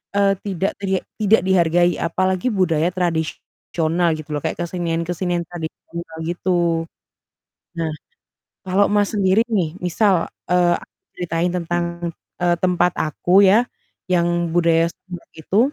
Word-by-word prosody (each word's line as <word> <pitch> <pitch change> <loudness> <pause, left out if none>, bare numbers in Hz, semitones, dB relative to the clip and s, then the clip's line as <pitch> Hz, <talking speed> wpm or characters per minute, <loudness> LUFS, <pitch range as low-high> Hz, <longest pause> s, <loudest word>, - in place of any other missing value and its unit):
eee, 200 -1 +3
tidak 195 -1 -1
teriek 190 -1 -1 0.2
tidak 215 0 +4
dihargai. 175 -1 +3
Apalagi 185 +5 0
budaya 170 -3 +2
tradisional 170 -1 -1
gitu 155 0 -10
loh 150 - 0
kayak - - -2
kesenian-kesenian 175 0 -2
tradisional 165 0 -8
gitu. 170 -1 0 0.9
Nah, 160 -1 -1 0.7
kalau 190 +2 +3
Mas, 205 0 +2
sendiri 190 +2 +4
nih 180 -6 -1
misal, 180 0 +2 0.2
eee, 175 -1 +4
aku - - -19 0.2
ceritain 170 0 -1
tentang, 175 0 -1 0.6
eee, 175 -1 +3
tempat 180 -1 +2
aku 175 +5 +3
ya, 220 +6 +5 0.5
yang 175 -1 +1
budaya 165 -1 +3
sound - - -40 0.2
horeg - - -22
itu, 195 +7 +1
175 Hz, 125 wpm, -21 LUFS, 165-185 Hz, 0.9 s, ya